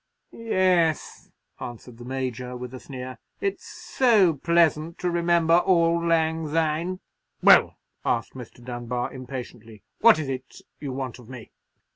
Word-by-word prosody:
'" - - -53
"Yes," 185 -7 0 0.3
answered 120 0 -9
the 120 - -9
Major, 125 -1 -4
with 125 0 -8
a 130 - -7
sneer; 130 -1 -8 0.2
"it's 395 -1 -3
so 215 -10 +2
pleasant 165 +1 +1
to 180 0 -1
remember 170 -1 +2
'auld 170 -2 +2
lang 160 -1 +1
syne!'" 165 +4 -1 0.4
"Well," - - +6 0.3
asked 115 -2 -1
Mr. 120 -1 -11
Dunbar, 120 0 -4
impatiently, 125 -4 -9 0.2
"what 230 -6 +7
is 155 -3 -3
it 130 -1 -6 0.2
you 140 -2 -5
want 130 -2 -5
of 120 -1 -15
me?" 125 -4 -10
150 Hz, 140 wpm, -25 LUFS, 125-170 Hz, 0.4 s, what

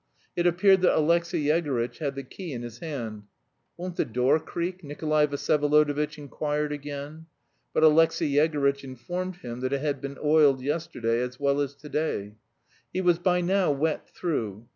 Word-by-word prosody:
It 175 0 +2
appeared 190 +2 +4
that 185 - +4
Alexey 170 0 +2
Yegorytch 145 -6 0
had 140 -3 -2
the 135 - -5
key 170 +4 -8
in 120 -1 -5
his 120 0 -8
hand. 115 -10 -5 0.5
"Won't 180 0 -6
the - - +3
door 125 +6 +2
creak?" 175 +3 -4
Nikolay 150 +1 +1
Vsyevolodovitch 150 +1 +1
inquired 150 +1 -2
again. 145 +2 -7 0.4
But - - +1
Alexey 160 0 +5
Yegorytch 140 -2 +2
informed 175 +9 -5
him 120 -8 -7
that 130 +1 -2
it 140 - 0
had 145 -1 -1
been 140 0 -6
oiled 150 -3 +4
yesterday 140 -6 -1
"as 125 0 -4
well 140 0 +2
as 140 0 -3
to 145 +2 -12
day." 145 -10 -2 0.6
He 185 - -1
was 175 -2 +3
by 180 0 +2
now 185 -1 +2
wet 150 +2 -1
through. 115 - -3
150 Hz, 165 wpm, -27 LUFS, 140-165 Hz, 0.6 s, Alexey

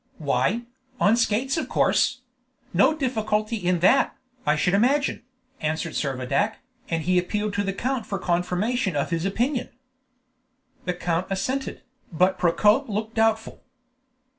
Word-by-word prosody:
"Why, 185 +10 0 0.4
on 205 +3 +4
skates 240 +5 +1
of 320 - -3
course; 270 -2 +2 0.5
no 200 - +4
difficulty 220 -5 -1
in 180 -3 0
that, 245 +10 +4 0.3
I 150 - +4
should 180 +4 +1
imagine," 265 +8 +2 0.4
answered 160 -2 -2
Servadac, 135 -1 -1 0.3
and 165 -1 -1
he 180 +1 +3
appealed 210 +3 -2
to 205 - 0
the 195 - -1
count 245 +3 -2
for 200 - -2
confirmation 180 +4 0
of 145 +4 -1
his 165 +1 -1
opinion. 245 +6 -1 1.2
The 180 - -1
count 175 0 -1
assented, 260 +8 -3 0.3
but 180 +3 +2
Procope 210 +9 +3
looked 215 +2 -3
doubtful. 225 0 0
205 Hz, 135 wpm, -24 LUFS, 175-235 Hz, 1.2 s, on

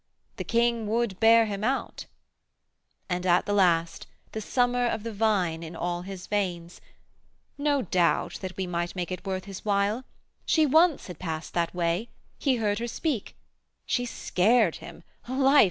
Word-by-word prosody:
The - - -3
king 235 -1 +1
would 220 -3 -1
bear 230 0 +6
him 205 -1 -4
out;' 265 +4 -2 1.0
and 180 -1 -2
at 175 -1 +3
the 205 - -1
last 170 -4 +2 0.2
The 220 - -4
summer 245 +2 +1
of 220 -2 -2
the 230 -1 -5
vine 195 -6 +1
in 165 0 -8
all 175 +1 -2
his 185 0 -8
veins 180 -4 -3 0.7
'No 285 -2 +1
doubt 175 -1 +1
that 185 -1 -6
we 190 - -1
might 175 0 -3
make 180 0 -3
it 185 +2 -5
worth 190 -1 -3
his 195 -2 -8
while. 205 +3 +1 0.4
She 315 -1 +3
once 320 +2 +4
had 180 -4 -9
past 160 -2 -5
that 170 0 -1
way; 175 +6 0 0.3
he 270 -3 +2
heard 210 -3 0
her 235 - -3
speak; 250 -2 -3 0.5
She 245 -1 0
scared 215 -3 +2
him; 170 - -11 0.2
life! 270 +3 +4
205 Hz, 165 wpm, -27 LUFS, 180-235 Hz, 1.0 s, bear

